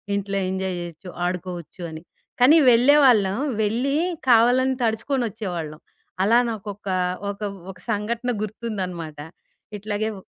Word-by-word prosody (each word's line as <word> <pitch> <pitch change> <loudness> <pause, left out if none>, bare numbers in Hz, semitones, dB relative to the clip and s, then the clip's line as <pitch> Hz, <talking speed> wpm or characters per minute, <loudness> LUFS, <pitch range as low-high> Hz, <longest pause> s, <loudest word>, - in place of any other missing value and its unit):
ఇంట్లో 200 0 -2
ఎంజాయ్ 190 -1 -2
జెయొచ్చు. 175 +1 -8 0.2
ఆడుకోవచ్చు 180 -1 -5
అని. 160 0 -8 0.4
కానీ 295 +6 +7
వెళ్ళే 250 +5 +6
వాళ్ళం. 205 -6 +4 0.3
వెళ్లీ 245 +7 0 0.3
కావాలని 250 +3 +5
తడుచుకొనొచ్చేవాళ్ళం. 220 - -2 0.4
అలా 225 +4 +4
నాకు 215 -2 -6
ఒకా 195 -2 -3 0.3
ఒక 200 - -12 0.3
ఒక 185 - -15
సంఘటన 230 +4 -1
గుర్తుందనమాట. 185 -8 -5 0.6
ఇట్లాగే 210 +1 -2
ఓ - - -9
205 Hz, 115 wpm, -23 LUFS, 185-235 Hz, 0.6 s, కానీ